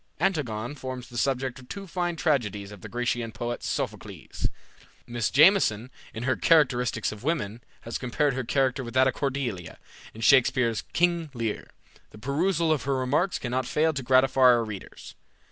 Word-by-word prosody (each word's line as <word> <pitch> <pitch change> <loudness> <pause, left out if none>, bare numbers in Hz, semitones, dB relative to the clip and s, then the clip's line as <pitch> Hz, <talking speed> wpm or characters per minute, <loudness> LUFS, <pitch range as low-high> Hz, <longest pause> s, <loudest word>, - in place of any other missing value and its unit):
Antigone 125 - -1
forms 130 -3 -7
the 120 - -13
subject 130 -1 -1
of 125 - -16
two 200 -1 -6
fine 175 -1 -2
tragedies 105 - -1
of 100 -3 -11
the - - -9
Grecian 120 -1 -2
poet 120 +1 -4
Sophocles. - - -4 0.6
Mrs. 120 -2 -1
Jameson, 135 - +4 0.2
in 115 - -6
her 130 +1 +1
"Characteristics 125 -8 +2
of 105 0 -10
Women," 125 -8 -2 0.2
has 115 - -5
compared 135 +3 0
her 130 0 -2
character 135 +1 0
with 120 +1 -8
that 130 0 +5
of 130 - +1
Cordelia, 125 - -3 0.4
in 115 - -9
Shakspeare's 125 -2 +4
"King 170 -2 +1
Lear." 115 -3 -3 0.4
The - - -14
perusal 160 - 0
of 155 -4 0
her 140 0 +1
remarks 145 +8 +1
cannot 125 0 -2
fail 160 +4 +2
to 140 - -3
gratify 130 +1 +3
our 125 -2 +6
readers. 105 -3 -9
130 Hz, 165 wpm, -26 LUFS, 120-145 Hz, 0.6 s, our